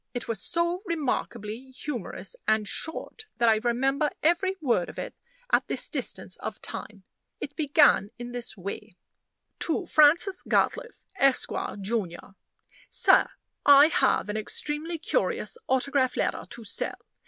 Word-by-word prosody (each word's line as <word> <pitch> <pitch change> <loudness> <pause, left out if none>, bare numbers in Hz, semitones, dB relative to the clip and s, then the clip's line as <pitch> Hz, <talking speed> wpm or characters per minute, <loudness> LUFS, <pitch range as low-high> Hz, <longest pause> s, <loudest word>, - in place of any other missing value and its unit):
It 245 - -4
was 220 -4 -2
so 340 +1 0
remarkably 260 - -3
humorous 260 - -5
and 215 -1 +2
short, 385 - -4
that 240 -1 +3
I 220 - +5
remember 270 +6 +1
every 350 +4 +2
word 235 - +1
of - - -11
it - - -5 0.4
at - - +3
this - - -2
distance - - -4
of - - -6
time. 205 -2 -6 0.4
It 290 - -6
began 295 -8 +4
in 240 0 -7
this 240 -3 -5
way: 195 +2 -7 0.6
"To 345 +3 -1
Francis 335 +6 +4
Gatliffe, - - 0 0.2
Esq., 275 -1 +4 0.3
Jun. 200 -3 -1 0.8
"SIR - - +4 0.3
I 285 +2 +8
have 265 - +2
an 210 +1 -3
extremely 300 +9 -3
curious 330 - -1
autograph 260 0 +1
letter - - -1
to 235 - -9
sell. 215 - -4
270 Hz, 135 wpm, -27 LUFS, 230-315 Hz, 0.8 s, I